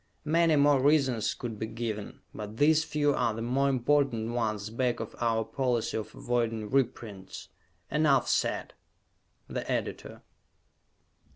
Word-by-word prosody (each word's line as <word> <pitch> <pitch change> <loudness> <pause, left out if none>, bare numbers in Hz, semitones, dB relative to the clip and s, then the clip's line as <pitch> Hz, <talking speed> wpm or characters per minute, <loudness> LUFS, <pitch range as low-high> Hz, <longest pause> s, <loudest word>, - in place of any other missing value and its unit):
Many 165 +1 +3
more 145 -2 +4
reasons 135 -6 +2
could 115 -4 -6
be 110 - -2
given, 110 -2 -5
but 105 +1 -7
these 155 +3 +4
few 145 -2 +1
are 120 -4 0
the 115 - -4
more 135 +4 +1
important 130 -3 +1
ones 110 -3 -2
back 120 +1 0
of 115 - -6
our 115 -2 +1
policy 125 -1 -1
of 110 - -5
avoiding 115 -3 -1
reprints. 110 -7 -2 0.4
Enough 150 -2 +3
said! - - 0 0.7
_The - - -4
Editor. - - -4
120 Hz, 130 wpm, -29 LUFS, 110-140 Hz, 0.7 s, more